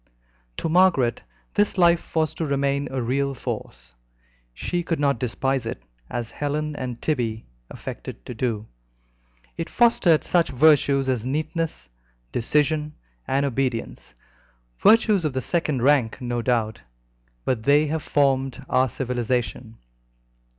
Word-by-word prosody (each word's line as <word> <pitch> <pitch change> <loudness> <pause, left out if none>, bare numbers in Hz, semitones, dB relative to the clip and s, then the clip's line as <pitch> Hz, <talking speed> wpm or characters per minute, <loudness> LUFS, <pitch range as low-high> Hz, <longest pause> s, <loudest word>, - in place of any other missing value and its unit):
To - - -2
Margaret 160 -9 +3 0.3
this 205 0 +1
life 170 -2 +3
was 160 -1 +1
to 165 - -3
remain 140 0 0
a 130 -2 -2
real 135 +3 0
force. - - -6 0.6
She 175 - -2
could 165 -2 -2
not 140 -4 +1
despise 130 +1 -1
it, - - -6 0.3
as 120 -2 -4
Helen 150 +1 -2
and 125 -3 -5
Tibby 120 -7 -2 0.2
affected - - -8
to - - -6
do. 110 -2 -2 0.9
It 165 0 -4
fostered 210 -9 +4
such 175 -2 +2
virtues 140 -1 +4
as 125 -4 0
neatness, 155 - -3 0.4
decision, 150 +4 0 0.3
and 140 +1 +1
obedience, 120 - -3 0.6
virtues 215 -4 +5
of 150 -4 -1
the 130 - -1
second 150 -5 -1
rank, 135 -5 +3
no 120 -2 -2
doubt, 115 -3 0 0.6
but 125 -4 0
they 145 +5 +4
have 155 +1 -2
formed 135 -2 0
our 130 0 +2
civilization. 120 -2 -2
135 Hz, 130 wpm, -24 LUFS, 120-155 Hz, 0.9 s, virtues